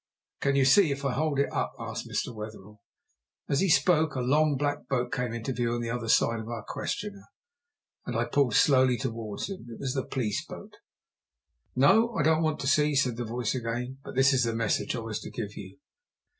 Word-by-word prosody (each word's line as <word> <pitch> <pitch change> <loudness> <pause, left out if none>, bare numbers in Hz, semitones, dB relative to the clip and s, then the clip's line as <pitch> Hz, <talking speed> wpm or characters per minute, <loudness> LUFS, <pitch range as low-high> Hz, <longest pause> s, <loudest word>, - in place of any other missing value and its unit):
"Can 140 0 +2
you 135 -1 +4
see 155 +4 +5
if 140 0 -4
I 135 - +1
hold 155 0 0
it 140 - 0
up?" - - -1
asked - - -6
Mr. 125 - -2
Wetherell. 105 -1 -9 0.7
As 140 - +1
he 195 - +2
spoke 155 0 +3
a - - -1
long, 145 +3 +2
black 145 +1 -2
boat 125 -2 -1
came 125 -2 -1
into 115 +3 -3
view 120 -1 -1
on 120 - -2
the 115 -1 -3
other 115 -2 -3
side 115 +1 +3
of 110 +1 -7
our 115 -3 -5
questioner, 200 -1 -4 0.8
and - - -2
pulled 135 -7 +2
slowly 130 -3 +4
towards 115 -4 -4
him. 190 -9 -8
It 115 - -9
was 130 -2 -2
the 135 - -1
police 115 -6 -2
boat. - - -10 1.0
"No, 220 - +4
I 160 - +1
don't 160 +1 +3
want 155 -1 0
to 135 - -2
see," 150 +1 +3
said 130 -4 +2
the 120 +1 -4
voice 120 0 -2
again. 125 +1 -4
"But - - -9
this 135 +1 +5
is 130 -1 +3
the 115 -1 -1
message 115 +1 0
I 115 - -3
was 110 -1 -4
to - - -8
give 105 -3 -6
you. 95 +2 -10
130 Hz, 210 wpm, -28 LUFS, 115-145 Hz, 1.0 s, see